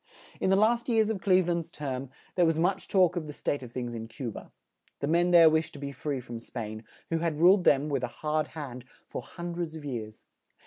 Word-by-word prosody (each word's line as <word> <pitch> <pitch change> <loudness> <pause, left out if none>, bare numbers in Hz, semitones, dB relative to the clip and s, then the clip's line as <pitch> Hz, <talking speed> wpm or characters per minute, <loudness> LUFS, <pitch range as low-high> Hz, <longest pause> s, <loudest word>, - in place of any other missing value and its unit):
In - - +1
the 190 - +5
last 235 +4 +2
years 220 -2 +3
of 200 -4 -4
Cleve 185 -3 +4
land's 170 -1 -1
term, 135 -4 -4 0.2
there 175 -2 +3
was 160 -1 +2
much 185 +4 0
talk 185 -3 +4
of 165 -3 -3
the 150 - -6
state 145 0 -2
of 125 -2 -9
things 120 -1 -4
in 115 -1 -5
Cu 115 +1 -5
ba. - - -10 0.5
The - - -1
men 170 +3 +3
there 170 -2 +8
wished 160 0 +2
to - - -9
be 140 0 -4
free 140 0 -3
from 120 -2 -7
Spain, 110 -2 -7 0.3
who 165 - +1
had 165 -2 -1
ruled 180 +2 +6
them, 140 +1 +4
with 140 -4 -1
a - - +1
hard 150 +4 -1
hand, 125 -5 -6 0.3
for - - -4
hun 175 0 -7
dreds 170 -2 -4
of 155 -2 -8
years. 110 -5 -6
155 Hz, 235 wpm, -29 LUFS, 130-175 Hz, 0.5 s, there